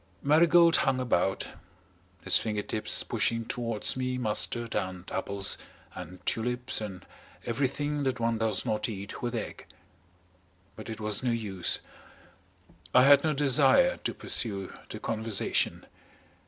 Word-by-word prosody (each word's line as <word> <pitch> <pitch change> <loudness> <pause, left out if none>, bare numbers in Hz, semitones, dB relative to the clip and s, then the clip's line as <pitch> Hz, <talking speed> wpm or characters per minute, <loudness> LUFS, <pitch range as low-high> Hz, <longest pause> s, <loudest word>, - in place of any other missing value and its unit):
Marigold 170 +3 +5
hung 130 -1 +1
about, 95 -6 0 0.7
his - - +3
finger 105 -2 +1
tips 110 - 0
pushing 115 0 0
towards 115 -3 -2
me 130 -1 -2
mustard 115 0 -1
and 95 -1 -3
apples 100 +1 -1 0.3
and 90 +3 -10
tulips 125 +1 -1
and 95 -4 -7 0.4
everything 145 +4 -1
that 130 -2 -1
one 115 -1 0
does 110 -3 0
not 105 +2 -1
eat 100 -2 -7
with 120 0 -2
egg. 115 - -6 1.1
But 110 - -9
it 110 - -6
was 105 -1 -2
no 130 - 0
use. 105 -6 -1 1.1
I 125 - +8
had 140 +1 +7
no 155 -1 +1
desire 150 - +4
to - - -4
pursue 100 -5 -1 0.2
the - - -6
conversation. 110 -2 0
115 Hz, 130 wpm, -29 LUFS, 105-130 Hz, 1.1 s, I